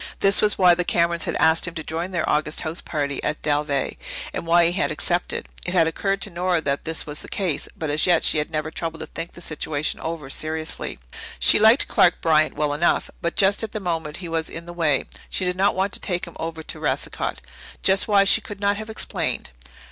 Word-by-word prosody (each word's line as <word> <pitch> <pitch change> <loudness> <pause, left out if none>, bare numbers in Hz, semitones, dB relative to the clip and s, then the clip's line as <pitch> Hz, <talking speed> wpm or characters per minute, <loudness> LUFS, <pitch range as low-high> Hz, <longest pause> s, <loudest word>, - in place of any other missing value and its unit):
This 195 0 +5
was 210 -1 +3
why 180 -2 +6
the 180 +1 0
Camerons 170 -1 +1
had - - -2
asked 160 +2 +4
him 170 - -7
to 160 - -4
join 165 +4 -3
their 175 -4 -2
August 150 +1 0
house 165 +1 -4
party 140 -2 -3
at 150 - -2
Dalveigh, 145 -2 0 0.4
and 170 - -5
why 170 +1 +5
he 170 - +3
had 180 - 0
accepted. 175 0 -2 0.2
It 175 - -2
had 165 -2 +5
occurred 195 +4 -1
to 205 - -6
Nora 175 0 +1
that 140 -2 -2
this 160 0 -1
was 150 0 -2
the - - -5
case, 180 -7 -1
but 155 -2 -2
as 150 +4 +2
yet 175 -2 +4
she 155 - +4
had 150 - -2
never 155 -1 -3
troubled 165 0 -5
to - - -4
think 170 - -7
the 175 - -12
situation 155 -2 -2
over 160 -4 -5
seriously. 155 - -4 0.4
She 60 - +5
liked 220 +5 +6
Clark 175 - +4
Bryant 155 -1 +3
well 150 -1 0
enough, 165 +4 +1
but 170 -1 -2
just 200 0 +3
at 220 -2 -3
the 215 - -2
moment 165 -5 -3
he - - -5
was 165 -1 -2
in 165 +1 -7
the 175 - -8
way. 155 -5 +1 0.3
She 185 - +1
did 180 0 0
not 195 +2 +2
want 190 +1 0
to - - 0
take 175 -2 -2
him 170 - -12
over 165 0 -5
to - - -6
Racicot - - -2 0.5
just 195 +1 +3
why 200 -2 +5
she 195 - +4
could 205 -1 -9
not 200 0 +1
have 215 +1 -7
explained. 220 - -3
170 Hz, 230 wpm, -23 LUFS, 155-185 Hz, 0.5 s, why